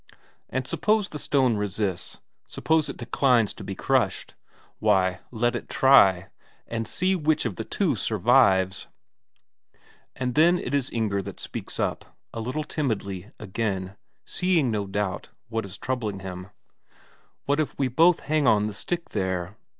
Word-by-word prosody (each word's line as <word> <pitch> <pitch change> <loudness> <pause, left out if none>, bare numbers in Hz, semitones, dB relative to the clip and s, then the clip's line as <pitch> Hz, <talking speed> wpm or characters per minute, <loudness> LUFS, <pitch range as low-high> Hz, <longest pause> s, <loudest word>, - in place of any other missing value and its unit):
And 130 0 -2
suppose 210 +8 +1
the 150 - -6
stone 130 -7 +2
resists, 100 -2 -3 0.3
suppose 160 -1 +1
it - - -6
declines 120 -2 +2
to - - -10
be - - -5
crushed? - - 0 0.5
Why, 95 -1 +2
let 120 +1 0
it - - -6
try 95 -9 +5 0.4
and 115 -1 -3
see 185 +7 +1
which 155 -5 +1
of 110 -6 -2
the - - -4
two - - 0
survives! 95 0 +3 1.3
But 125 -1 -2
then 170 +6 +5
it 125 - -5
is 140 -2 +1
that - - -10
Inger 100 -4 0
speaks - - -7
up, - - -3 0.2
a - - -5
little 130 +7 -3
timidly, 100 - -3
again; 95 -2 -3 0.3
seeing, 170 -9 +1
no 105 -2 -2
doubt, 95 -2 -3 0.2
what 115 -2 -2
is 100 +1 -7
troubling 110 -7 -3
him: 90 0 -7 1.0
"What 145 +2 +1
if 155 - -2
we 135 - +1
both 165 +7 +4
hang 150 -2 +1
on 105 -2 +4
the 105 - -3
stick 170 - -4
there?" 95 -1 -2
115 Hz, 150 wpm, -25 LUFS, 95-140 Hz, 1.3 s, try